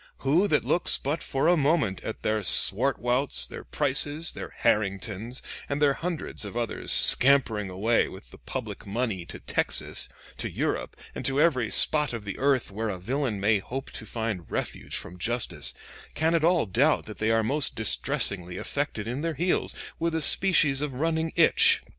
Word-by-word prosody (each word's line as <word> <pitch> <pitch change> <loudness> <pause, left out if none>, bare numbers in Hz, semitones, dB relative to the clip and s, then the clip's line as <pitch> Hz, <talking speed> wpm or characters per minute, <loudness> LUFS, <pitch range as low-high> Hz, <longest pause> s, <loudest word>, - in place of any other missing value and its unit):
Who 165 +9 +3
that - - +1
looks 175 - +3
but 145 +4 -3
for 135 +3 -1
a 175 - +5
moment 145 - +1
at 110 - -6
their 110 0 0
Swartwouts, 125 +6 +3
their - - -9
Prices, 145 +4 +1
their - - -8
Harringtons, 105 +4 -1 0.3
and 140 0 -2
their 145 -2 +3
hundreds 165 -5 -5
of 105 +3 -7
others 120 -1 -1
scampering 120 -7 +6
away 105 +6 +1
with 95 +2 -12
the - - -15
public 115 -5 -7
money 100 -5 -3
to - - -8
Texas, - - -1 0.3
to - - -3
Europe, - - -3 0.2
and - - -6
to 135 +1 +1
every 130 -9 +2
spot 150 -4 0
of 115 -3 -6
the 95 - -6
earth 135 -5 +1
where 110 +3 -3
a 95 - -4
villain 120 +3 -2
may 105 +1 +2
hope 130 +7 -7
to 110 - -9
find 110 -7 -4
refuge - - -5
from 90 - -7
justice, 110 - -2 0.4
can 160 +2 +1
at 165 -2 +1
all 170 -3 +3
doubt 125 +11 +1
that 105 - -10
they 110 - 0
are 115 0 +2
most 140 +5 +1
distressingly 100 -6 0
affected 140 -6 -4
in 125 +5 -4
their 165 -1 -2
heels 175 +5 0 0.2
with 165 0 -1
a 160 - -1
species 155 -6 +3
of 145 -3 -4
running 160 +3 -1
itch? - - +4
125 Hz, 175 wpm, -26 LUFS, 105-150 Hz, 0.4 s, scampering